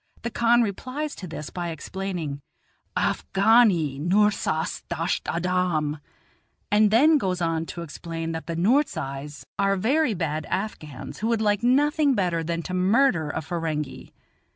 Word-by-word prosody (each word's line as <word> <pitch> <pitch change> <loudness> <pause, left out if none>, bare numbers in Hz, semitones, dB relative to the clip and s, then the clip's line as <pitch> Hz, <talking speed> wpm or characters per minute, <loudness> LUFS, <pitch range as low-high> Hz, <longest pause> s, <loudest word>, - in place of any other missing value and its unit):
The 235 - -3
khan 235 +1 +4
replies 260 +8 -4
to 185 - -8
this 155 -2 -7
by 175 -1 -4
explaining, 165 -3 -4 0.6
"Afghani 195 - +3
Noorzais 195 -2 +1
dasht 170 +1 -2
adam," 170 -4 0 0.7
and 210 0 +5
then 290 +8 +5
goes 185 -5 -1
on 165 -1 -1
to 170 - -6
explain 165 +1 -5
that 160 -2 -5
the 165 - -3
Noorzais 155 - 0
are 195 0 +3
very 250 +5 +1
bad 155 -3 -2
Afghans, 170 - -5
who 220 - -1
would 230 -1 +1
like 205 -1 +1
nothing 285 +3 +3
better 175 -5 0
than 170 +1 -2
to 185 - -5
murder 185 - +3
a - - -3
Ferenghi. 155 -4 -4
180 Hz, 140 wpm, -25 LUFS, 160-220 Hz, 0.7 s, and